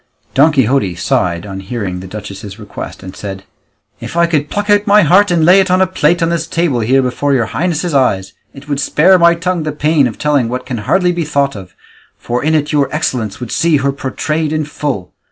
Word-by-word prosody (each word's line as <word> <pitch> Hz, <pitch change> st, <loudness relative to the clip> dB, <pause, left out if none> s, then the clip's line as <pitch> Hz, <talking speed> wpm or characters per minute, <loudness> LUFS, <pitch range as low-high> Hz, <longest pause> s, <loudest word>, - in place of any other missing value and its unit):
Don 145 Hz, +4 st, +5 dB
Quixote 130 Hz, -, +1 dB
sighed 85 Hz, 0 st, -1 dB
on 95 Hz, -1 st, -7 dB
hearing 95 Hz, -3 st, -4 dB
the 95 Hz, -, -9 dB
duchess's 100 Hz, 0 st, -8 dB
request, 105 Hz, -3 st, -9 dB
and 95 Hz, 0 st, -9 dB
said, 95 Hz, -2 st, -7 dB, 0.6 s
"If -, -, -7 dB
I 170 Hz, -, +5 dB
could 150 Hz, -3 st, -1 dB
pluck 205 Hz, 0 st, -3 dB
out 205 Hz, 0 st, +3 dB
my 205 Hz, 0 st, +6 dB
heart, 190 Hz, +6 st, +4 dB
and 170 Hz, -3 st, +2 dB
lay 185 Hz, +3 st, +6 dB
it 190 Hz, -1 st, +1 dB
on 185 Hz, +1 st, +3 dB
a 190 Hz, -, +4 dB
plate 175 Hz, -2 st, +1 dB
on 165 Hz, -, +1 dB
this 165 Hz, -1 st, -2 dB
table 165 Hz, -8 st, 0 dB
here 130 Hz, +4 st, +2 dB
before 140 Hz, +3 st, 0 dB
your 120 Hz, -3 st, +1 dB
highness's 170 Hz, +3 st, -2 dB
eyes, 100 Hz, -9 st, +1 dB, 0.2 s
it 140 Hz, +1 st, -14 dB
would 145 Hz, -2 st, -2 dB
spare 180 Hz, +6 st, +4 dB
my 170 Hz, 0 st, +5 dB
tongue 180 Hz, 0 st, -2 dB
the 155 Hz, 0 st, -3 dB
pain 150 Hz, -1 st, +2 dB
of 115 Hz, -, -7 dB
telling 145 Hz, -6 st, +1 dB
what 125 Hz, +1 st, -4 dB
can 125 Hz, -4 st, -4 dB
hardly 180 Hz, -2 st, +3 dB
be 175 Hz, -1 st, -2 dB
thought 140 Hz, -3 st, 0 dB
of, 95 Hz, -3 st, -11 dB, 0.4 s
for 120 Hz, +2 st, -3 dB
in 160 Hz, +1 st, +2 dB
it 150 Hz, -1 st, 0 dB
your 145 Hz, -3 st, +1 dB
excellence 125 Hz, -9 st, -2 dB
would 125 Hz, -3 st, -6 dB
see 165 Hz, -2 st, +2 dB
her 140 Hz, 0 st, 0 dB
portrayed 150 Hz, +3 st, -3 dB
in 155 Hz, -1 st, -1 dB
full. 140 Hz, -11 st, -4 dB
145 Hz, 225 wpm, -14 LUFS, 115-170 Hz, 0.6 s, my